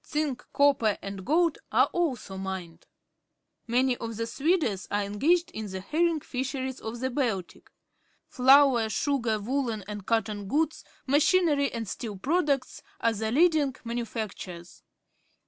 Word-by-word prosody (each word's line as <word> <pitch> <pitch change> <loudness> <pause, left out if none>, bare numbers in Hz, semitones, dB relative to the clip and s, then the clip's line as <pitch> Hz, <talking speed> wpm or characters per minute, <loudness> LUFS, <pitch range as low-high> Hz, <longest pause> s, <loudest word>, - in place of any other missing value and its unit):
Zinc, 300 -4 -2
copper, 275 -7 +3
and 195 -1 -6
gold 330 - +2
are - - +5
also 265 - -1
mined. 190 -3 -6 0.8
Many 250 +2 +2
of 230 -1 -5
the 230 - -1
Swedes 270 - 0
are 205 0 0
engaged 300 - +1
in 220 -1 -5
the 190 0 -5
herring 320 - 0
fisheries 260 0 -4
of 230 +2 -6
the 260 0 -1
Baltic. 230 -10 -3 0.6
Flour, 260 -3 +5
sugar, 235 -4 0
woollen 230 -1 -2
and 205 -1 -6
cotton 215 -3 -1
goods, 310 +7 0 0.2
machinery, 290 0 +3
and 230 -2 -4
steel 210 0 -5
products 280 - 0 0.2
are 230 - +2
the 220 +1 -2
leading 300 -2 +3
manufactures. 220 -7 -6
245 Hz, 130 wpm, -27 LUFS, 210-285 Hz, 0.8 s, are